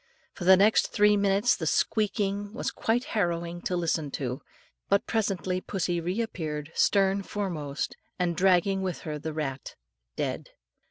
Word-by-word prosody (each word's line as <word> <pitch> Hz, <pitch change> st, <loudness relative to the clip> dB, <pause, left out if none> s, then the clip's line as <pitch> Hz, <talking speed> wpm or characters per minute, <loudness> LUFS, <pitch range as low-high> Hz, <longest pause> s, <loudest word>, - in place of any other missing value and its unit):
For 175 Hz, -, -7 dB
the 190 Hz, +1 st, +8 dB
next 210 Hz, +3 st, +4 dB
three 210 Hz, 0 st, +4 dB
minutes 200 Hz, +5 st, +3 dB
the 160 Hz, -, -3 dB
squeaking 205 Hz, +1 st, 0 dB
was -, -, -2 dB
quite 235 Hz, +2 st, 0 dB
harrowing 175 Hz, -4 st, -1 dB
to 180 Hz, -, -1 dB
listen 160 Hz, -3 st, 0 dB
to; 130 Hz, 0 st, -3 dB, 0.5 s
but 200 Hz, 0 st, +3 dB
presently 190 Hz, -4 st, -1 dB
pussy 175 Hz, -3 st, -2 dB
re 180 Hz, +6 st, -2 dB
appeared 155 Hz, -8 st, -4 dB
stern 195 Hz, 0 st, +3 dB
foremost, 170 Hz, -9 st, -4 dB, 0.2 s
and 175 Hz, -2 st, 0 dB
dragging 190 Hz, +1 st, +3 dB
with 185 Hz, -3 st, -3 dB
her 150 Hz, -2 st, -5 dB
the 160 Hz, +2 st, -4 dB
rat 140 Hz, -4 st, -4 dB, 0.4 s
dead. -, -, -3 dB
185 Hz, 150 wpm, -28 LUFS, 165-200 Hz, 0.5 s, the